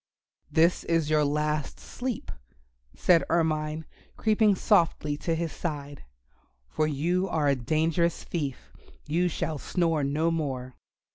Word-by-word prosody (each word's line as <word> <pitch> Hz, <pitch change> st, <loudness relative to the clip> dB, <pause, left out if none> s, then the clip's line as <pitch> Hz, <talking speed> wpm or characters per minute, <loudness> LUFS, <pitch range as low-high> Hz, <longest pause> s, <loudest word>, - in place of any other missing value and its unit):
"This 165 Hz, +2 st, +3 dB
is 165 Hz, -2 st, +1 dB
your 155 Hz, -1 st, +4 dB
last 150 Hz, 0 st, -1 dB
sleep," 245 Hz, -2 st, -5 dB, 0.6 s
said 170 Hz, -2 st, +4 dB
Ermine, 155 Hz, -1 st, 0 dB, 0.3 s
creeping 215 Hz, -2 st, +3 dB
softly 170 Hz, -7 st, +2 dB
to 165 Hz, +2 st, -1 dB
his 165 Hz, -1 st, -2 dB
side, 145 Hz, -4 st, -5 dB, 0.6 s
"for 155 Hz, -, 0 dB
you 175 Hz, +6 st, 0 dB
are 150 Hz, -2 st, +1 dB
a 140 Hz, -, +4 dB
dangerous 160 Hz, +6 st, 0 dB
thief; 145 Hz, -7 st, -5 dB, 0.3 s
you 170 Hz, +4 st, +1 dB
shall 155 Hz, -2 st, -3 dB
snore 165 Hz, -3 st, 0 dB
no 155 Hz, +4 st, +1 dB
more." 130 Hz, -6 st, -3 dB
155 Hz, 125 wpm, -27 LUFS, 150-170 Hz, 0.6 s, your